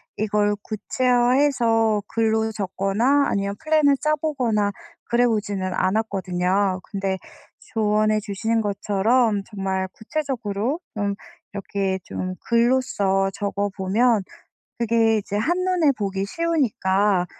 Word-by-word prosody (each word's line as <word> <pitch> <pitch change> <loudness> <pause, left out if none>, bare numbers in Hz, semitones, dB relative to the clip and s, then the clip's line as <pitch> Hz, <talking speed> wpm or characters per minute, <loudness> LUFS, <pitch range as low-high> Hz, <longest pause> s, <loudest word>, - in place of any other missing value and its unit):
이걸 210 -1 +1
구체화해서 240 -2 +2
글로 220 -1 +1
적거나 210 +7 +1
아니면 200 0 -1
플랜을 305 -3 +3
짜 305 +1 +1
보거나 245 -9 0 0.3
그래 240 +1 +2
보지는 200 -4 -1
않았거든요. 190 -2 0
근데 195 -2 -2 0.6
조언해 215 -1 +2
주신 225 +3 -1
것처럼 205 +2 +1
정말 190 -2 -3
구체적으로 245 -1 -3 0.2
음 200 -1 -1 0.4
이렇게 195 -1 -2
좀 185 0 -4
글로써 230 -5 +2
적어 200 0 -2
보면 210 +3 +2 0.5
그게 230 -1 +2
이제 205 0 -4
한눈에 350 - +2
보기 195 -1 -2
쉬우니까 210 - +1
215 Hz, 255 characters per minute, -23 LUFS, 195-245 Hz, 0.6 s, 플랜을